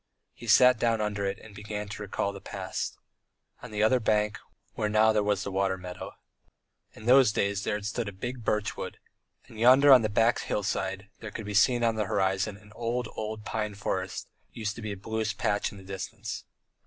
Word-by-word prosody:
He 120 - -11
sat 125 +2 +6
down 115 -1 +2
under 105 -1 -1
it 95 - -2
and 110 - -14
began 105 0 -5
to 105 - -7
recall 100 0 -2
the 100 - -9
past. - - -4 0.6
On - - -8
the 105 0 0
other 125 +4 +4
bank, 105 -2 +1 0.3
where 105 - -1
now 110 +1 +4
there 105 - +3
was 100 -1 0
the 100 - -4
water 95 0 +1
meadow, 90 0 -8 0.8
in 110 - -12
those 130 -1 +6
days 100 -1 0
there 105 - 0
stood 105 +2 -2
a - - -8
big 120 +5 -6
birchwood, 105 0 -2 0.5
and 110 - -12
yonder 130 +4 +8
on 130 - +8
the 110 - 0
bare 115 +3 +4
hillside 100 0 -2
that 110 -2 -8
could 110 - -5
be 105 - -4
seen 120 +4 +4
on 115 -1 +2
the 105 - +1
horizon 95 +1 0
an 105 +1 -18
old, 120 0 -2
old 110 0 -5
pine 105 -2 -2
forest 95 -2 -3 0.2
used 110 -2 -3
to 120 - -8
be 110 -1 -4
a 100 - -5
bluish 110 +1 -2
patch 105 0 0
in 100 - -11
the 95 - -12
distance. 100 +3 -6
105 Hz, 205 wpm, -28 LUFS, 100-110 Hz, 0.8 s, yonder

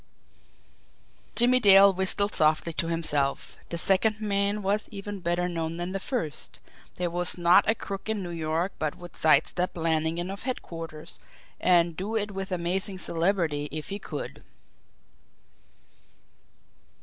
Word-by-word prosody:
Jimmie 250 +2 +4
Dale 200 -3 +7
whistled 190 +2 +1
softly 155 +2 +2
to 165 - -1
himself. 150 -4 +1
The 170 - -3
second 200 +5 +2
man 200 0 0
was 205 +2 0
even 205 -1 -7
better 175 0 0
known 165 -1 -3
than 175 +1 -4
the 195 - -3
first; 190 - -3 0.4
there 175 -1 -2
was 175 +1 +2
not 175 +3 +5
a 225 - +4
crook 195 0 -6
in 215 -3 -1
New 175 - -6
York 165 +3 -1
but 155 -1 -2
would 175 -1 -11
side 155 - +4
step 180 0 -3
Lannigan 165 +2 0
of 200 - -7
headquarters, 165 - -6 0.4
and 170 -2 +3
do 200 +6 -4
it 210 -1 -1
with 195 -1 -5
amazing 185 +2 -1
celerity 165 -5 0
if 155 -1 -5
he 200 +1 -4
could! - - -7
180 Hz, 140 wpm, -27 LUFS, 165-200 Hz, 0.4 s, Dale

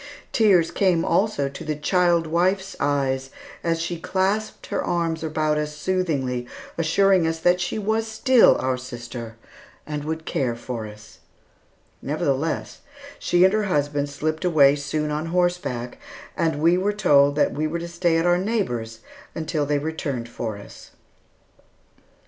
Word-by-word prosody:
Tears 195 -7 +4
came 180 -4 +2
also 195 -9 +1
to 140 - -8
the 155 0 -2
child 170 +2 +2
wife's 185 +4 0
eyes 135 -2 0 0.3
as 165 -1 0
she 170 0 -3
clasped 195 +5 -1
her - - -2
arms 165 -2 -1
about 155 -1 0
us 150 0 -4
soothingly, 145 -9 -1 0.3
assuring 175 +2 +3
us 165 0 -1
that 175 +2 +2
she 175 - -2
was 220 +2 0
still 240 +3 +5
our 130 0 -1
sister, 120 -2 -8 0.5
and 150 -1 -4
would 160 +1 -4
care 125 -4 -1
for 120 -2 -5
us. 105 +1 -14 0.8
Nevertheless, 145 +1 -2 0.4
she 175 0 +3
and 190 +1 +5
her 215 -1 +1
husband 145 -5 0
slipped 155 +3 -3
away 145 -6 +5
soon 150 +1 -2
on 150 +2 -2
horseback, 175 -9 -1 0.4
and 160 -2 0
we 170 +2 +4
were 205 +2 0
told 145 -8 +4
that 150 - +2
we 155 +2 -1
were 165 +2 -3
to 170 0 -5
stay 170 -1 +1
at 165 - +1
our 175 0 +3
neighbor's 120 - -2 0.3
until 160 -2 -2
they 145 0 +1
returned 145 -5 -3
for 115 -3 -5
us. 100 - -13
160 Hz, 150 wpm, -23 LUFS, 140-180 Hz, 0.8 s, still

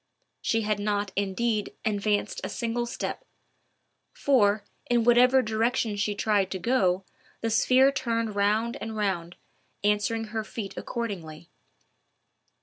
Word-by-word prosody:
She 225 - +1
had 210 -1 0
not, 205 -1 -1
indeed, 205 +2 -1
advanced 205 -1 0
a - - -3
single 240 0 -2
step; - - -4 0.9
for, 215 -7 +3 0.3
in 240 -1 +3
whatever 250 +2 +5
direction 220 0 0
she 205 0 -1
tried 200 -2 +1
to 190 - -3
go, 190 -4 +1 0.4
the 225 - -1
sphere 260 +4 +5
turned 230 -5 -1
round 215 +3 +1
and 220 -1 -5
round, 180 -5 -1 0.5
answering 210 +2 +1
her 220 -1 -1
feet 215 -2 -6
accordingly. 175 -8 -5
215 Hz, 125 wpm, -27 LUFS, 205-235 Hz, 0.9 s, whatever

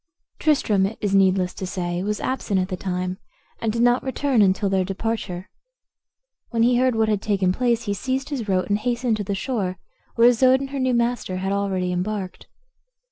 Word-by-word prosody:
Tristram, 215 -11 +2
it 220 - -8
is 205 -2 -1
needless 190 -2 +3
to 190 - -5
say, 175 -1 -3
was 210 +2 -2
absent 225 -7 -1
at 185 0 -1
the 185 - -2
time, 180 0 -3 0.4
and 225 - 0
did 230 +2 0
not 245 +1 +4
return 265 -2 +1
until 195 +1 +3
their 190 -1 +1
departure. 195 -1 -4 1.0
When 230 -2 +1
he 245 +1 +4
heard 255 -1 +2
what 220 0 +2
had 210 -2 0
taken 195 -4 +1
place 235 0 +1
he 205 -3 -1
seized 265 +6 -2
his 245 -8 -4
rote, 185 -1 +1
and 205 0 +1
hastened 240 0 0
to 210 - -3
the 200 0 -2
shore, 195 -5 -2 0.4
where 235 0 +6
Isoude 255 +2 +5
and 275 0 -6
her 280 - -3
new 255 -1 +1
master 235 -5 -1
had 190 +1 -2
already 195 -2 -1
embarked. 185 +1 -4
210 Hz, 195 wpm, -23 LUFS, 190-245 Hz, 1.0 s, where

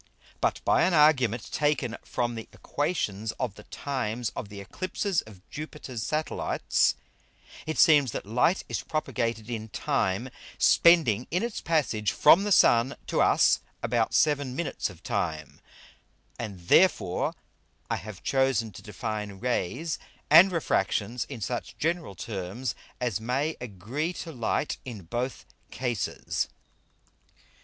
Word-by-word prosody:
But - - 0
by - - +4
an 185 - +3
Argument 130 -7 +3
taken 140 -6 0
from 120 -1 -2
the 115 -1 -7
Æquations 110 - -2
of 125 -6 -1
the 105 - -14
times 120 -5 -3
of 100 - -5
the 100 -1 -9
Eclipses 185 - -2
of 95 -4 -15
Jupiter's 150 -6 -6
Satellites, 155 +6 0 0.7
it 160 - -2
seems 145 -7 +6
that - - -5
Light 125 - +2
is - - -2
propagated 115 -7 -2
in 110 -2 -5
time, 115 -2 -1 0.3
spending 150 -10 +5
in 180 +5 0
its 235 -2 -3
passage 115 -11 0
from 175 +7 +6
the 205 - -1
Sun 125 -6 +5
to - - 0
us - - +4 0.2
about 115 -1 +1
seven 145 -4 +2
Minutes 170 - -2
of - - -14
time: 75 -2 -3 0.8
And 100 -6 -6
therefore 95 - +3 0.5
I - - -1
have 105 -3 -9
chosen 130 -5 +1
to 90 - -11
define 105 -1 -4
Rays 125 - -2 0.3
and 170 +5 +9
Refractions 115 - 0
in 130 -5 -8
such 120 +4 -4
general 165 - -1
terms 100 +5 -4 0.3
as 120 -5 -1
may 135 +7 -1
agree 125 - -3
to 170 - -7
Light 125 +2 -1
in 115 -7 -8
both 120 +10 -4 0.2
cases. 120 -5 -2
125 Hz, 130 wpm, -27 LUFS, 110-150 Hz, 0.8 s, and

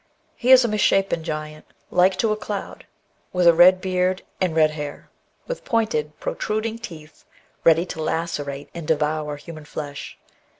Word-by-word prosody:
He 245 - -2
is 255 -2 +8
a - - +2
misshapen 195 -5 +2
giant 155 -1 -6 0.2
" - - -39
like 185 +1 +4
to 220 +3 +1
a - - +2
cloud," 210 -2 -6 0.5
with 180 -1 +2
a 170 - +8
red 180 +2 +7
beard 185 0 0 0.2
and 180 -4 +1
red 155 -1 +4
hair, 150 -1 -7 0.3
with - - -5
pointed 215 -10 -1
protruding 220 +1 -2
teeth, 160 -9 -11 0.4
ready 165 +1 +5
to 160 - -6
lacerate 145 -4 -3
and 170 -3 -7
devour 150 -1 0
human 155 +1 -10
flesh. 145 -1 -7
170 Hz, 160 wpm, -23 LUFS, 155-195 Hz, 0.5 s, is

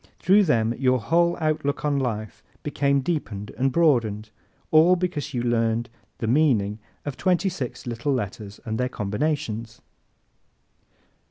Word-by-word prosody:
Through 200 +3 +4
them 115 -7 +2
your 130 -1 +3
whole 170 +7 +2
outlook 155 -2 -1
on 145 -1 +1
life 110 -5 -3 0.2
became 140 -2 +1
deepened 105 - -3
and 135 +1 +1
broadened 115 -10 +2 0.4
all 160 +4 +6
because 165 -6 -3
you 120 - -1
learned 115 -1 0 0.3
the - - -3
meaning 115 -6 +2 0.3
of 145 -2 -4
twenty 185 +1 +2
six 140 -9 -6
little 120 +3 -2
letters 105 -4 -4
and 110 0 -3
their 125 0 0
combinations! 115 0 -2
130 Hz, 135 wpm, -24 LUFS, 115-155 Hz, 0.4 s, all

